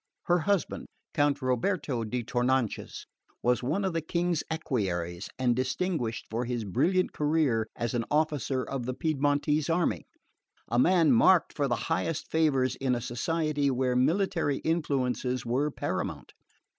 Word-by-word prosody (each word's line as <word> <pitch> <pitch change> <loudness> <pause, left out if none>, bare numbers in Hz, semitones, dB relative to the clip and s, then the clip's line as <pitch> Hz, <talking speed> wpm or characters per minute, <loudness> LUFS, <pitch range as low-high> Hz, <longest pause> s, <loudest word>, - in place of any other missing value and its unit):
Her 175 0 +2
husband, 200 +2 -1 0.3
Count 145 -2 +1
Roberto 130 0 0
di 120 +2 -3
Tournanches, 125 -1 -1 0.4
was 125 0 +2
one 160 +11 -1
of 190 - -1
the 165 - 0
King's 170 +1 -1
equerries 95 - -2
and 125 -2 +2
distinguished 130 -2 -1
for 115 +2 -2
his 120 -1 -2
brilliant 180 - +1
career 145 -7 +1
as 120 -1 -2
an 120 -2 -1
officer 150 -4 0
of 130 -3 -4
the 130 - -2
Piedmontese 150 0 +1
army 165 0 0 0.6
a 120 - +1
man 165 0 +5
marked 170 +9 +5
for 145 -2 +1
the 120 - +1
highest 165 -1 -2
favours 145 -5 +2
in 130 -2 0
a - - -2
society 145 +4 -1
where 130 -1 0
military 160 +1 +1
influences 130 -6 -1
were 130 +6 +1
paramount. - - -4
140 Hz, 145 wpm, -28 LUFS, 125-160 Hz, 0.6 s, man